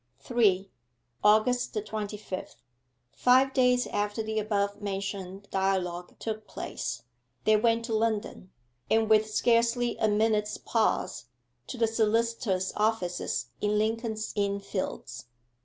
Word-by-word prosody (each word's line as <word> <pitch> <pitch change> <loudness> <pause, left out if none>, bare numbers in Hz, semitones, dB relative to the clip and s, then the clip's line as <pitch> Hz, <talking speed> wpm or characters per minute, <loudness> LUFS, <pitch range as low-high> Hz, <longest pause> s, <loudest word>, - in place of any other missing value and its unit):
3. 195 - +1 0.5
AUGUST 220 +4 +3
THE 210 - 0
TWENTY 210 -1 -4
FIFTH 190 -9 -7 0.5
Five 260 +2 +4
days 250 -1 +3
after 205 +2 -2
the 220 0 -1
above 205 -1 -1
mentioned 195 -1 -4
dialogue 185 -2 -1
took 215 -1 -5
place - - -5 0.4
they 215 - +5
went 230 +1 +2
to 230 - -3
London, 220 -4 -1 0.4
and, 225 0 +3
with 215 0 +5
scarcely 235 +2 +2
a 220 - +2
minute's 210 0 +1
pause, - - 0 0.4
to 255 - -6
the 230 - +3
solicitors' 225 -3 0
offices 210 -5 -1
in 210 0 +1
Lincoln's 220 0 -1
Inn 200 -1 0
Fields. 185 - -5
215 Hz, 125 wpm, -28 LUFS, 200-230 Hz, 0.5 s, they